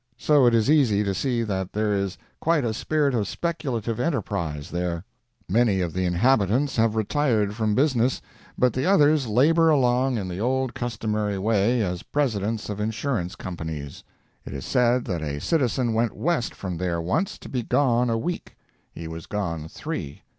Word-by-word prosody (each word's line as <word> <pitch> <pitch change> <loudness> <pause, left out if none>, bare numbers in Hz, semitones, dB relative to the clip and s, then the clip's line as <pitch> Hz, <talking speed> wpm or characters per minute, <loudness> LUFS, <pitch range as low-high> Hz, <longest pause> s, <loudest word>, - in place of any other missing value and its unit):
So 140 0 +4
it 120 - +4
is 110 0 +2
easy 130 -9 +4
to 100 -1 -1
see 120 +4 0
that 95 -4 -3
there 105 0 0
is 100 -1 -1 0.2
quite 165 -5 +2
a 110 - 0
spirit 145 +4 0
of 110 -4 0
speculative 120 -10 -3
enterprise 100 - -2
there. 85 0 -2 0.4
Many 110 -1 +2
of 85 -3 -2
the 95 0 -1
inhabitants 115 +7 +2
have 115 -1 +2
retired 110 -2 +1
from 110 -1 0
business, 130 -3 +2 0.4
but 125 -2 +3
the 130 +2 -1
others 150 -7 +4
labor 160 +9 +4
along 130 -3 +2
in 100 -3 -3
the 90 0 -5
old 130 +1 0
customary 110 -4 -2
way, 110 +3 +2
as 90 -2 -3
presidents 110 -6 -1
of 105 -1 -5
insurance 105 -3 -2
companies. 80 -5 -6 0.4
It - - -8
is 70 - -6
said 125 -1 +2
that 90 -6 -3
a 70 -2 -3
citizen 125 - +1
went 115 +1 0
west 165 -7 -1
from 90 -3 -5
there 85 -1 -1
once, 95 - -1
to - - -11
be 125 - -2
gone 125 -1 +2
a 115 - +1
week. 175 +10 -4 0.4
He 85 - -8
was 80 0 -8
gone 85 -7 -3
three. 85 - -6
115 Hz, 175 wpm, -24 LUFS, 95-130 Hz, 0.4 s, So